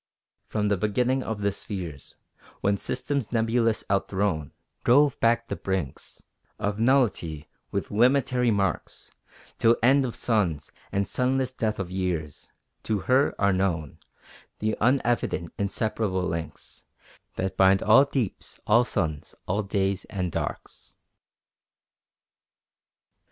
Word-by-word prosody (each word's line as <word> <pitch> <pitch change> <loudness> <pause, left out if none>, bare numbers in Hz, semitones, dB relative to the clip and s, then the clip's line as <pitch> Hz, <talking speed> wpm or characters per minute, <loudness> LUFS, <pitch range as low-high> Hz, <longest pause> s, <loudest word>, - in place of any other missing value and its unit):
From 105 -1 -1
the 100 - +2
beginning 125 +6 +1
of 110 -4 -4
the 100 - +2
spheres, 90 -8 -6 0.5
When 100 0 +2
systems 125 +4 -3
nebulous 115 -1 +1
out 100 0 +1
thrown 95 -7 -1 0.3
Drove 140 +3 +4
back 115 +1 +2
the - - -4
brinks 95 -8 -4 0.3
Of 105 +1 -2
nullity 105 - +1 0.2
with - - -3
limitary 125 +2 +3
marks, 100 -2 -2 0.5
Till 115 +1 +4
end 135 +3 +5
of 125 -3 -3
suns, 95 - 0 0.2
and 100 0 0
sunless 130 0 0
death 110 -4 -2
of 90 -2 -4
years, 90 -5 -3 0.3
To 105 -3 -1
her 130 +3 +2
are 100 -1 +3
known 90 -6 -1 0.6
The 110 0 -1
unevident 120 -8 +1
inseparable 100 -1 -1
links 80 -2 -6 0.5
That 95 0 -2
bind 95 0 +4
all 120 +7 +6
deeps, 130 -7 -3
all 115 +3 +5
suns, 80 -11 -3
all 100 +3 0
days 100 -1 -1
and 90 -4 -3
darks. - - -5
105 Hz, 120 wpm, -26 LUFS, 95-120 Hz, 0.6 s, all